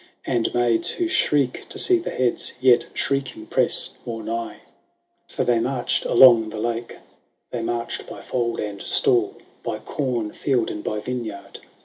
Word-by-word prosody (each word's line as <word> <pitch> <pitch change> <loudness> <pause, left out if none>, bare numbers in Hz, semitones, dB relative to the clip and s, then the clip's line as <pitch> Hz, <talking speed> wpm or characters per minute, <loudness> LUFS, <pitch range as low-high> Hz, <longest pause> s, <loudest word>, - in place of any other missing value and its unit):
And 120 -3 0
maids 120 -2 +2
who 350 - -1
shriek 145 - +1
to - - -6
see 365 -1 +4
the 340 - -5
heads, 125 -2 0
Yet, 125 -2 +4
shrieking, 135 -5 -2
press - - +2
more 115 -2 -5
nigh. 115 +1 -4 0.7
So - - -2
they 120 -2 +2
marched 125 +1 -1
along 115 -4 +7
the 110 - -7
lake; 115 +1 -3 0.5
They 120 - -3
inarched 115 0 -3
by - - -9
fold 120 -2 -2
and 105 -2 -4
stall. 115 -4 +2 0.2
By - - -3
corn 120 -7 -3
field 125 -5 0
and 105 - -6
by 105 0 -3
vineyard. 115 -4 -6
120 Hz, 155 wpm, -23 LUFS, 115-130 Hz, 0.7 s, along